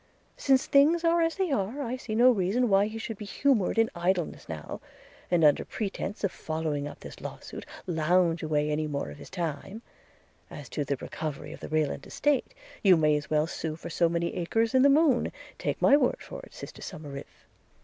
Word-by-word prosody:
Since 265 -2 +3
things 310 +5 +4
are 335 0 +3
as 330 0 +1
they 380 -4 -1
are, 240 +4 -1
I 245 0 -2
see 245 -4 -5
no 245 +3 +7
reason 220 +4 +1
why 195 +1 +4
he 220 +1 -6
should 225 -1 -6
be 210 - -6
humoured 225 -1 +1
in 225 0 +3
idleness 175 - -1
now, 80 -2 -6 0.5
and, 175 -2 +3
under 150 -2 +5
pretence 205 -1 -4
of 200 - +1
following 155 -2 -3
up - - -10
this - - -10
law - - -6
suit, - - -9 0.2
lounge 170 0 +2
away 150 -1 0
any 155 +1 0
more 140 - -3
of 75 - -11
his - - -11
time: 175 +5 -4 0.7
as 145 -4 -9
to 145 - -2
the 140 - -1
recovery 150 +1 -6
of - - -11
the - - -8
Rayland 155 -3 -1
estate, 290 - 0 0.3
you 190 -4 +6
may 155 -1 +3
as 150 0 -3
well 150 0 +2
sue 160 -1 -4
for 165 - -8
so 170 +1 +2
many 170 0 -1
acres 225 +6 0
in 260 - +5
the 280 - +6
moon; 280 -3 +3 0.3
take - - -2
my 280 - +6
word 270 -4 +2
for - - -9
it, - - -19
sister - - -9
Somerive.' 145 -6 -9
180 Hz, 205 wpm, -28 LUFS, 155-245 Hz, 0.7 s, no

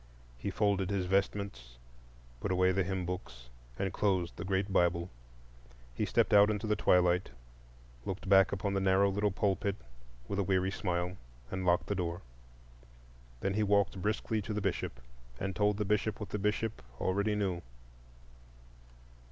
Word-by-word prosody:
He - - -3
folded 100 -3 +1
his 100 -2 0
vestments, 95 -10 -1 0.6
put 95 - -2
away 90 0 +3
the 95 +1 +1
hymn 95 -1 -2
books, - - -6 0.3
and 95 -2 -2
closed 95 -4 0
the - - -6
great 95 +1 -1
Bible. 85 -1 +2 0.8
He - - -1
stepped - - +2
out 105 0 +7
into 105 0 -1
the 105 0 +2
twilight, 90 -2 +3 0.7
looked 95 +1 -5
back 95 0 +6
upon 100 0 -1
the 95 - +1
narrow 95 +1 +4
little 105 +1 +1
pulpit 100 0 0 0.5
with 100 - -2
a - - +3
weary 95 0 +1
smile, 90 -2 -2 0.3
and 95 -1 -3
locked 85 0 +3
the - - -1
door. 90 -2 -3 1.2
Then 95 - 0
he 105 - +1
walked 100 -2 +2
briskly 110 +2 -1
to 105 +2 -4
the - - 0
Bishop, - - -2 0.4
and 95 -1 -3
told 105 +1 +2
the 105 - -1
Bishop 105 +1 0
what 105 - -6
the 105 - -3
Bishop 105 +2 -1 0.2
already 100 +3 +1
knew. 95 -4 -1
95 Hz, 160 wpm, -32 LUFS, 90-100 Hz, 1.2 s, out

